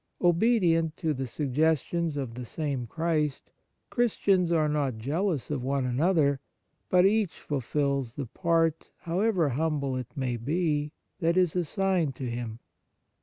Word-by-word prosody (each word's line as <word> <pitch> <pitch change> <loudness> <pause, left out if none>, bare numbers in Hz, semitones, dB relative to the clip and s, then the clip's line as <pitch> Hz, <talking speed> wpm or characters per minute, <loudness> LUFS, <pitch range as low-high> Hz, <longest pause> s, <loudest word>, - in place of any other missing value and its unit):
Obedient 175 -4 +3
to 160 -2 0
the 135 -1 -3
sugges 150 +3 +1
tions 170 -3 -2
of 130 -5 -3
the 125 +1 -6
same 135 -1 -3
Christ, 155 0 -1 0.4
Christians 195 -7 +2
are 160 -2 +3
not 145 -5 0
jealous 150 - -1
of 135 -4 -2
one 135 0 0
another; 140 +2 +2 0.5
but 180 0 +5
each 205 -2 +2
fulfils 140 -2 -1
the 140 - -3
part, 165 +3 0
however 180 -2 +1
humble 140 -1 -1
it 125 -2 -4
may 130 -4 -1
be, 150 +3 0 0.3
that 170 +1 +2
is 180 -3 +3
assigned 180 -3 0
to 130 - -4
him. 120 -2 -4
150 Hz, 140 wpm, -28 LUFS, 135-170 Hz, 0.5 s, but